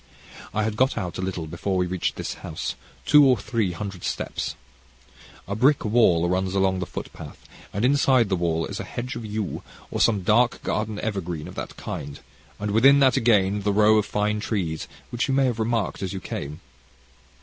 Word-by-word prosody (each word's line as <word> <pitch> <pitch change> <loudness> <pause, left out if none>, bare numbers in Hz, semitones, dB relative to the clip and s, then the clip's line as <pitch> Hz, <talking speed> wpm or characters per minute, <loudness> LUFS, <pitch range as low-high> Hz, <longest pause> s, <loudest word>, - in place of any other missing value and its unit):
"I 105 +1 0
had 105 0 -2
got 130 +1 +2
out 90 -5 -3
a - - -1
little 95 -3 -3
before 85 +4 -2
we 90 - +2
reached 90 0 -2
this - - -4
house, - - -4 0.3
two 150 -1 +7
or 130 -3 +5
three 105 -2 -1
hundred 95 0 -6
steps. - - -3 0.9
A 100 - -2
brick 135 +5 +3
wall 105 -7 +4
runs 95 +1 0
along 95 -1 +2
the 90 - -3
footpath, - - -9 0.2
and 100 +4 0
inside 130 -3 +4
the 95 - +1
wall 80 -2 0
is - - -6
a - - -3
hedge 125 +1 -5
of 120 - -6
yew, 105 -1 -3 0.3
or - - -1
some 105 -5 +3
dark 120 +6 +3
evergreen 105 -6 -2
of - - -9
that - - -7
kind, 70 0 -6 0.4
and 105 0 -2
within 135 +7 +6
that 135 -2 +5
again 105 -3 +3
the 105 +1 +1
row 105 +1 +5
of 105 - -2
fine 105 0 0
trees 90 -8 -2 0.2
which 120 +3 -1
you 135 - +1
may 135 0 +4
have 120 -3 -1
remarked 115 -4 -1
as 95 -1 -3
you 95 - -4
came. 75 -2 -6
105 Hz, 195 wpm, -24 LUFS, 95-115 Hz, 0.9 s, two